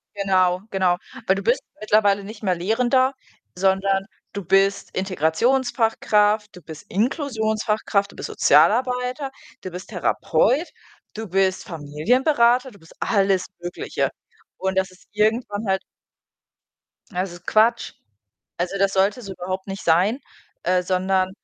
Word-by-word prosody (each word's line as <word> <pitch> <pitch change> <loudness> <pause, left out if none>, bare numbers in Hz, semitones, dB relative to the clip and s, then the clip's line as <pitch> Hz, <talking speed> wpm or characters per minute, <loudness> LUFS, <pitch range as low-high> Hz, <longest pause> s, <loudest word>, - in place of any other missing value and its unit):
Genau, 185 -2 +2
genau. 185 -3 +1 0.3
Weil 190 - +4
du 195 - -3
bist 235 +5 +2 0.2
mittlerweile 205 -2 +2
nicht 210 +2 -10
mehr 185 -3 +1
Lehrender, 250 +8 +2 0.4
sondern 195 +1 +1 0.3
du 200 - -5
bist 195 +2 +2
Integrationsfachkraft, 210 - +1
du 180 - -12
bist 160 -2 -11
Inklusionsfachkraft, 220 - 0
du - - -17
bist - - -6
Sozialarbeiter, 250 +2 +2 0.3
du 185 - -7
bist 180 +2 -8
Therapeut, 220 - +1 0.5
du 220 0 -5
bist 190 0 +1
Familienberater. 235 - +1
Du 200 - -18
bist 165 - -18
alles 195 -3 +2
Mögliche. 175 0 -3 0.5
Und 190 0 -2
das 190 0 +1
ist 185 - -21
irgendwann 215 0 0
halt 190 0 +1 1.3
Es 180 0 -2
ist 175 0 -14
Quatsch. 225 +2 +2 0.7
Also, 180 +3 -2
das 195 0 +2
sollte 195 +6 +1
so 200 -3 -7
überhaupt 185 +1 -5
nicht 195 0 -6
sein, 180 +9 +3 0.4
äh, 180 +1 +2
sondern 185 +1 +1
195 Hz, 130 wpm, -22 LUFS, 185-225 Hz, 1.3 s, Weil